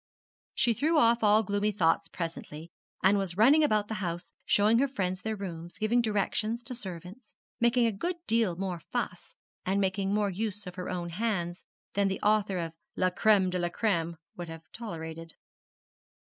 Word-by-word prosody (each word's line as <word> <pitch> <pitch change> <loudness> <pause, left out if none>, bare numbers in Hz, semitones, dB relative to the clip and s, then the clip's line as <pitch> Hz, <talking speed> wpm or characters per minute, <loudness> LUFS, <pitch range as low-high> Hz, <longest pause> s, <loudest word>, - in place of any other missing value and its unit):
She 235 - +3
threw 310 +7 +1
off 235 -4 +4
all 210 +1 +5
gloomy 205 0 0
thoughts 165 -5 +2
presently, 165 -1 -6 0.3
and 200 +2 +5
was 190 -2 -3
running 280 +9 +6
about 215 -7 +2
the 220 - -4
house, 175 -1 -4
showing 215 +3 +4
her 280 - +3
friends 185 -7 -2
their 220 0 -2
rooms, 175 -4 -7
giving 220 +4 +2
directions 220 +2 0
to 250 +1 -6
servants, 190 0 -9 0.2
making 235 +1 +4
a 230 - +3
good 345 - -2
deal 225 -5 +2
more 185 -1 -3
fuss, - - -4 0.3
and 195 +2 +1
making 195 0 0
more 205 -1 +1
use 205 +1 -3
of 180 - -7
her 180 0 -5
own 175 -1 -3
hands, 175 -3 -2 0.3
than 200 0 +2
the 195 - -2
author 205 -2 +2
of 165 -2 -3 0.2
'La 185 -1 +2
Crême 195 -1 +4
de 180 - -1
la 175 0 0
Crême' 170 -5 0 0.2
would 175 -1 -6
have 165 0 -8
tolerated. 165 -6 -7
200 Hz, 175 wpm, -29 LUFS, 175-220 Hz, 0.3 s, running